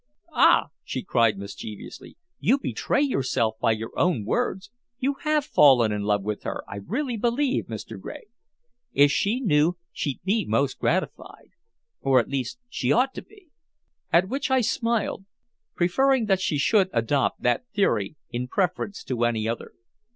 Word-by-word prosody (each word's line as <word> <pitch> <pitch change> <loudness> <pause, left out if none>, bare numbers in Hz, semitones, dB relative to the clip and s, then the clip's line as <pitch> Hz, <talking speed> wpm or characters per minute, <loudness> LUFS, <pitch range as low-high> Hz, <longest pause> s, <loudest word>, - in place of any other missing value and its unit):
"Ah!" - - +5
she - - -4
cried 115 - +2
mischievously. 100 +1 -9 0.2
"You 260 - +3
betray 280 +1 0
yourself 130 - 0
by 115 - +3
your 110 +1 -5
own 165 - +1
words. 195 - -2 0.3
You 275 +3 -1
have 305 -2 +1
fallen 130 - +5
in 105 0 -2
love 105 -1 0
with 105 0 -3
her, - - -4
I 100 - -7
really 240 - -3
believe, 250 +5 0
Mr. - - -7
Gregg. - - -8 0.7
If 145 +1 +5
she 210 - +1
knew, 170 - +2
she'd 135 +3 -3
be 210 +4 +1
most - - 0
gratified - - -2 0.5
or 135 -1 +4
at 120 - -2
least, 140 - -3
she 245 - -1
ought 260 +3 +3
to - - -6
be." 400 -6 -21 0.6
At 175 +2 +4
which 270 +6 -2
I 260 -1 +3
smiled, 230 -3 -1 0.5
preferring 250 +8 +2
that 195 -2 +1
she 160 -4 0
should 190 +6 +3
adopt 120 +4 0
that 125 - +1
theory 155 - 0 0.2
in 125 +1 -3
preference 185 +5 -2
to 120 -2 -2
any 115 -2 0
other. 115 +1 -4
175 Hz, 160 wpm, -25 LUFS, -, 0.7 s, Ah